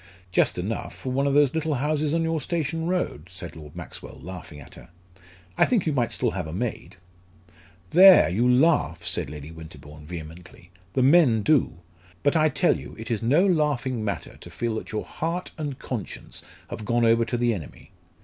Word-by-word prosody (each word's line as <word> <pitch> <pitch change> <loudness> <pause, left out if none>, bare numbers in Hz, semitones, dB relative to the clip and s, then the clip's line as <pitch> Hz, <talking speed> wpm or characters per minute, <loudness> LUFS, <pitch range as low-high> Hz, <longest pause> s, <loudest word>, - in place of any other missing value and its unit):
"Just 90 - +2
enough, 100 +6 -4
for 130 - -5
one 140 +2 +1
of 140 - +1
those 145 -2 +4
little 160 -2 -1
houses 150 +2 0
on 165 +1 +1
your 165 -1 -1
station 165 +1 -2
road," 180 - -2
said 90 -1 -8
Lord 75 -2 -11
Maxwell, - - -9
laughing 80 -2 -9
at 70 - -13
her. - - -14 0.7
"I - - +7
think 230 -8 +1
you 155 - 0
might 120 -4 0
still 120 -3 0
have 90 -4 -4
a 80 - -7
maid." 110 0 -4 0.9
"There, 185 - +8
you 115 +9 +2
laugh," 125 - +2
said 85 -6 -2
Lady 75 +1 -8
Winterbourne, 75 -2 -12
vehemently: 85 +1 -10 0.2
"the 130 - +2
men 130 -7 +5
do. 150 - +2 0.5
But 145 +2 +2
I 155 -1 +4
tell - - +2
you - - -10
it 110 +2 -7
is 110 - -1
no 145 - +3
laughing 145 - 0
matter 105 - -4
to - - -12
feel 120 -1 -3
that - - -7
your 110 - -3
heart 170 +3 -4
and 145 -4 -4
conscience 120 -7 -6 0.3
have - - -6
gone 120 +2 +1
over 115 0 +4
to 120 +1 -2
the 120 -1 +2
enemy. 85 - -9
120 Hz, 190 wpm, -25 LUFS, 90-150 Hz, 0.9 s, There